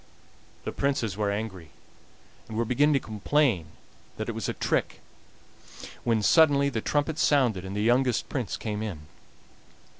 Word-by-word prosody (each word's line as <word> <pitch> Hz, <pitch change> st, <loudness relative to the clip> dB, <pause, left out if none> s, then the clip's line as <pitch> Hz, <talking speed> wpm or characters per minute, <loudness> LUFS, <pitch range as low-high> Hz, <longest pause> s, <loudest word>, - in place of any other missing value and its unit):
The -, -, -3 dB
Princes 135 Hz, -8 st, -1 dB
were 105 Hz, 0 st, 0 dB
angry, 100 Hz, -6 st, -4 dB, 0.8 s
and 110 Hz, -, -6 dB
were 115 Hz, -, +1 dB
beginning 145 Hz, +6 st, +3 dB
to 140 Hz, -, +3 dB
complain 110 Hz, -, 0 dB, 0.5 s
that -, -, -4 dB
it -, -, 0 dB
was -, -, -4 dB
a -, -, -1 dB
trick, -, -, -1 dB, 1.0 s
when 115 Hz, -2 st, +1 dB
suddenly 140 Hz, 0 st, +5 dB
the 115 Hz, -5 st, -3 dB
trumpets 145 Hz, +4 st, 0 dB
sounded 125 Hz, -10 st, +3 dB
and 95 Hz, +1 st, -6 dB
the 105 Hz, -, 0 dB
youngest 125 Hz, +1 st, +2 dB
Prince 125 Hz, -8 st, -3 dB
came 105 Hz, -1 st, -4 dB
in. 100 Hz, -8 st, -5 dB
115 Hz, 150 wpm, -27 LUFS, 105-140 Hz, 1.0 s, suddenly